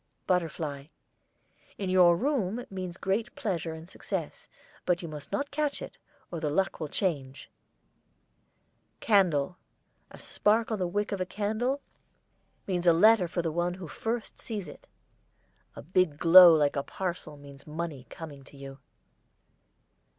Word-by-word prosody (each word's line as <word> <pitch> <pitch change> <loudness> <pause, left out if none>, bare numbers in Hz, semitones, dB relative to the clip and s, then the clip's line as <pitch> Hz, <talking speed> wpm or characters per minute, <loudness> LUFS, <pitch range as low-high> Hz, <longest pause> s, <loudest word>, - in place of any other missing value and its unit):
BUTTERFLY. 155 -5 -2 0.9
In 190 -2 -2
your 175 -2 +6
room 245 - -1
means 185 -2 -5
great 200 +5 -2
pleasure 170 -6 -3
and 160 +1 -11
success, - - -5 0.4
but 180 0 0
you - - -4
must 150 -2 -9
not 285 0 -2
catch 295 0 -1
it, - - -9 0.3
or 170 - -4
the 155 -2 -1
luck 190 +6 0
will 155 - -3
change. 140 -6 -3 1.5
CANDLE. 180 -6 +2 0.5
A - - -13
spark 220 +2 +1
on 215 - -1
the 180 - 0
wick 205 +4 -2
of 200 -2 -2
a - - 0
candle 220 +8 -1 0.8
means 180 -2 -1
a 170 - +8
letter 210 +2 +5
for 170 +1 -2
the 165 - -1
one 175 +2 -1
who 185 -2 -8
first 225 +8 -4
sees 210 -6 -5
it. 145 - -13 0.9
A - - -9
big 180 -2 +1
glow 175 +2 +9
like 145 -2 +2
a 140 - 0
parcel 170 -2 -5
means 140 0 -14
money 150 -4 -5
coming 150 -4 -9
to 140 - -16
you. 135 0 -10
180 Hz, 150 wpm, -29 LUFS, 155-205 Hz, 1.5 s, glow